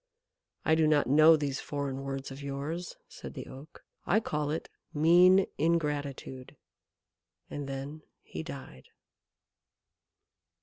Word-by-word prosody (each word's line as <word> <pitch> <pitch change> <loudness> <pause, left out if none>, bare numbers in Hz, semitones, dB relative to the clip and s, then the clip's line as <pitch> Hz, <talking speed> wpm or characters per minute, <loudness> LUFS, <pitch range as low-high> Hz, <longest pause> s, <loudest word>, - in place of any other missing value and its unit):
"I 160 - +4
do 160 -1 +4
not 150 -1 +3
know 155 +4 +7
these 140 -3 -2
foreign 140 -2 -4
words 135 0 -5
of 135 +1 -8
yours," 140 +5 -5
said - - -10
the - - -6
Oak. 135 +4 -13 0.2
"I 205 - +4
call 150 -8 -2
it 160 +2 -3 0.3
mean 180 +5 +6
ingratitude." 145 -5 -2 1.0
And 145 -1 -5
then 140 +3 -6 0.2
he - - -7
died. 135 - -9
145 Hz, 120 wpm, -30 LUFS, 135-160 Hz, 1.0 s, know